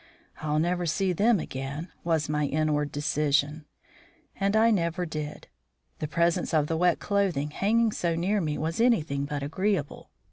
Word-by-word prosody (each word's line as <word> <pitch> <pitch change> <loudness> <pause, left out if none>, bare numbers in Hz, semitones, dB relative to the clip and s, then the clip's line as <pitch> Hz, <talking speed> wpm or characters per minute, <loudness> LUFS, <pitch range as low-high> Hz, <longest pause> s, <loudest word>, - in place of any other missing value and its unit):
"I'll 150 -1 -1
never 175 +2 0
see 185 +3 +1
them 210 +4 +3
again," 140 +5 -5
was 160 -3 +1
my 150 0 0
inward 150 -1 0
decision. 145 +1 0 0.7
And 200 +1 0
I 225 +1 +5
never 175 -3 0
did. 150 -2 -6 0.5
The 155 - -2
presence 170 +2 +1
of 150 -2 +3
the 160 - -2
wet 175 +1 +3
clothing 185 -8 0
hanging 225 +6 +2
so 170 -4 -1
near 195 +5 0
me 150 -3 -2
was 160 +7 -2
anything 155 - +2
but 145 -1 -4
agreeable. 185 +1 -2
165 Hz, 155 wpm, -27 LUFS, 150-190 Hz, 0.7 s, I